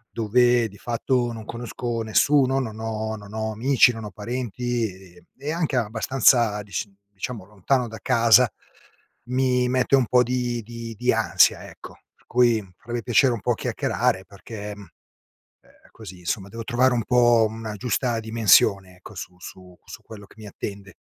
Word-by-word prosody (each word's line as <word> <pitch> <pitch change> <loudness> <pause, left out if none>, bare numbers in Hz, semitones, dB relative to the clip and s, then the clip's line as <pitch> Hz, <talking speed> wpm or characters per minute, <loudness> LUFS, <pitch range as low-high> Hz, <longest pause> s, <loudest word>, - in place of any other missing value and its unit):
dove 120 +1 +3
di 100 - -16
fatto 120 +2 -1
non 110 -1 -8
conosco 120 0 -5
nessuno, 135 +4 +2
non 110 -4 -5
ho 110 -1 -3
non 105 0 -13
ho 110 0 -3
amici, 130 +3 +4
non 110 -1 -7
ho 105 - -7
parenti 120 +2 -3
e 90 -2 -16
e 145 +3 -4
anche 165 -4 -1
abbastanza 115 -1 +2
dis 100 -4 -4 0.3
diciamo, 100 +1 -6
lontano 110 +6 -1
da 110 - -8
casa, 120 -1 +5 0.8
mi 125 0 +1
mette 130 +2 +2
un 130 - +2
po' 125 +1 +4
di 120 -1 -2
di 115 0 -8
di 125 +1 +1
ansia, 95 -6 +3
ecco. - - -13 0.2
Per - - -31
cui 120 -2 +3 0.2
avrei 120 +1 -4
piacere 125 +1 +3
un 115 - -5
po' - - 0
a - - +1
chiacchierare, 95 - -1
perché, 105 +2 -9
mhmm, 105 - -12 0.8
ehm, - - -25
così, 90 +1 -11
insomma, 95 +3 -4
devo 115 +3 -7
trovare 125 +2 +2
un 115 - 0
po' 120 -1 +4
una 110 0 -7
giusta 120 +2 -1
dimensione, 100 -4 +3
ecco, 100 +3 -13
su 90 -1 -8
su 90 0 -12
su - - -11
quello 105 -2 -12
che - - -21
mi 110 - -10
attende. 100 0 -8
115 Hz, 170 wpm, -23 LUFS, 105-125 Hz, 0.8 s, casa